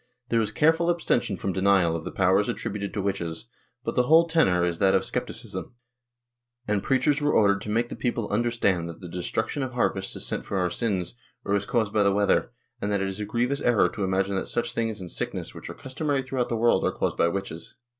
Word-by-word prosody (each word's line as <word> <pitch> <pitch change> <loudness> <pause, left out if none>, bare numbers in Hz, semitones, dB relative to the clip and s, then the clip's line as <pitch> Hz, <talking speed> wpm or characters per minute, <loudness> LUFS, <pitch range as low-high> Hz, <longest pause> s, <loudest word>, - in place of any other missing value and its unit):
There 115 -1 +3
is 105 -1 -1
careful 165 +5 +3
abstention 125 - +1
from 95 - -2
denial 95 -3 +3
of 80 - -4
the - - -4
powers 95 +2 +2
attributed 105 -3 -3
to 100 - -1
witches, 95 -1 -3 0.4
but - - -2
the 125 - +2
whole 165 +2 +6
tenor 95 - +3
is 85 -1 -2
that 95 -1 +4
of - - +2
scepticism, - - -5 0.9
and 105 -1 +1
preachers 135 +5 +2
were 145 0 +2
ordered 100 -2 +4
to 105 - -6
make 115 +3 0
the - - -5
people 120 -3 -2
imderstand 105 -6 +1
that 85 -1 -8
the 90 - -7
destruction 90 - -2
of 130 -2 -3
harvests 95 -5 0
is - - -1
sent - - -2
for 100 - -3
our 90 -2 +1
sins, 95 -5 -1 0.3
or 100 - 0
is 100 -1 0
caused 110 -4 0
by 105 - +3
the 100 -1 +4
weather, 100 +1 +2 0.3
and 105 - -1
that 100 - +1
it 95 0 -1
is 95 +1 -5
a 105 - -2
grievous 120 +6 -1
error 120 -4 +3
to 105 -4 -4
imagine 95 +1 0
that - - -2
such 120 0 -2
things 115 -2 -2
and 90 -2 -7
sickness, - - -4
which - - -9
are - - -7
customary 140 +1 -2
throughout 130 -2 -2
the 115 - -1
world, 120 +1 +3
are - - +2
caused - - -1
by - - +3
witches. 85 -2 -5
105 Hz, 230 wpm, -26 LUFS, 95-120 Hz, 0.9 s, whole